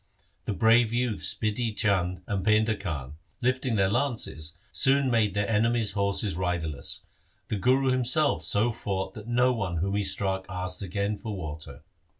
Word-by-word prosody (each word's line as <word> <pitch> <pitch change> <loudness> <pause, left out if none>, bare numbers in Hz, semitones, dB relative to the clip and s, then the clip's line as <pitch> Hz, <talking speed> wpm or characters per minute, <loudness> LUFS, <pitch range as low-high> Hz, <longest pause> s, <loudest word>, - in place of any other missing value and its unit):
The 105 - -2
brave 115 +1 +4
youths 120 -2 0
Bidhi 110 0 -2
Chand 90 -4 0
and 95 -1 -2
Painda 110 +2 +3
Khan, 75 -7 -5 0.2
lifting 130 -1 0
their 95 -2 +3
lances, 110 - -2
soon 135 -1 +3
made 110 -4 +2
their 100 0 +1
enemies' 115 0 +2
horses 100 -1 0
riderless. 85 -6 -2 0.4
The 105 - -1
Guru 130 +5 +3
himself 130 - +3
so 100 +7 +3
fought 95 -4 -3
that 105 0 -10
no 125 +1 +3
one 100 -7 -2
whom 95 +4 -1
he 105 - +1
struck 95 -1 -2
asked 90 0 -4
again 100 +2 -2
for 110 -1 -5
water. 75 -3 -7
105 Hz, 155 wpm, -27 LUFS, 95-120 Hz, 0.4 s, brave